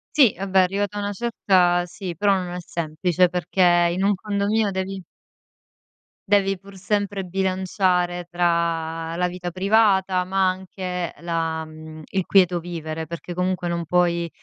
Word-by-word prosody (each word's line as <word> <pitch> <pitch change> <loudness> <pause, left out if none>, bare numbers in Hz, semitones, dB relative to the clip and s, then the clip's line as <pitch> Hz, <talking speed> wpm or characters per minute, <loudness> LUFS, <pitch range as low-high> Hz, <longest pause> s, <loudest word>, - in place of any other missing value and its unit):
Sì, 265 - +6
vabbè, 190 +1 +1
arrivata 200 +2 -1
a - - -1
una 205 0 -2
certa, 185 -5 +2
sì, 180 0 -7
però, 200 +4 +3
non 180 -2 -3
è - - -3
semplice 175 +1 0
perché 180 +1 -2 0.3
in 185 +2 -1
un 200 +1 +3
condominio 205 +1 0
devi 190 +1 -3 1.3
devi 195 -2 +3
pur 200 0 -14
sempre 200 0 -1
bilanciare 185 -1 0
tra 165 -1 -1
la 180 +1 +1
vita 180 0 -5
privata, 190 -1 +2
ma 190 0 +2
anche 185 -1 -4
la 165 -1 -2
mhmm, 155 0 -11
il 190 -2 -2
quieto 180 -3 +4
vivere 160 -2 -5
perché 170 +1 -7
comunque 180 0 -1
non 170 -1 -2
puoi 170 0 +1
180 Hz, 145 wpm, -23 LUFS, 170-195 Hz, 1.3 s, Sì